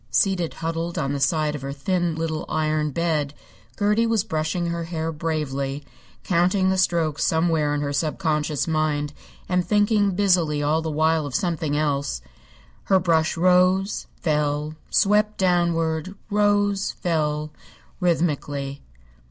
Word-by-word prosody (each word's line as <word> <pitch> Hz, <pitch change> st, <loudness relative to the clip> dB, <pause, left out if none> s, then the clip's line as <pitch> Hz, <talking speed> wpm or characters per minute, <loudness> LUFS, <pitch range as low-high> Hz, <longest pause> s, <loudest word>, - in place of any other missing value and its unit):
Seated 180 Hz, -, +1 dB
huddled 165 Hz, +1 st, -3 dB
on 140 Hz, -3 st, -1 dB
the 140 Hz, -, -2 dB
side 150 Hz, +2 st, +1 dB
of 150 Hz, -, -5 dB
her 135 Hz, +1 st, -4 dB
thin 175 Hz, +4 st, -1 dB
little 160 Hz, -1 st, -2 dB
iron 155 Hz, -1 st, 0 dB
bed, 150 Hz, -2 st, -1 dB, 0.4 s
Gertie 210 Hz, +2 st, +2 dB
was 225 Hz, -4 st, +2 dB
brushing 160 Hz, -2 st, -2 dB
her 170 Hz, 0 st, -2 dB
hair 165 Hz, -1 st, -3 dB
bravely, 145 Hz, -3 st, -3 dB, 0.4 s
counting 185 Hz, +2 st, +2 dB
the 190 Hz, -, 0 dB
strokes 165 Hz, -5 st, +1 dB
somewhere 160 Hz, -2 st, +2 dB
in 145 Hz, -, -1 dB
her 145 Hz, -1 st, -2 dB
sub 155 Hz, +1 st, -1 dB
conscious 150 Hz, -2 st, 0 dB
mind 150 Hz, -2 st, 0 dB, 0.3 s
and 180 Hz, -1 st, +1 dB
thinking 205 Hz, 0 st, +2 dB
busily 175 Hz, -7 st, +2 dB
all 155 Hz, +2 st, +2 dB
the 160 Hz, -, -3 dB
while 155 Hz, 0 st, +1 dB
of 135 Hz, -, -6 dB
something 165 Hz, -6 st, -1 dB
else. 140 Hz, -, -1 dB, 0.6 s
Her 190 Hz, -1 st, +4 dB
brush 165 Hz, -2 st, +1 dB
rose, 185 Hz, +3 st, +3 dB
fell, 150 Hz, -1 st, -1 dB, 0.2 s
swept 210 Hz, +1 st, +2 dB
downward, 170 Hz, -1 st, +1 dB, 0.2 s
rose, 205 Hz, -1 st, +2 dB
fell, 155 Hz, -3 st, -1 dB, 0.5 s
rhythmically. 145 Hz, -6 st, -1 dB
160 Hz, 135 wpm, -23 LUFS, 150-180 Hz, 0.6 s, Her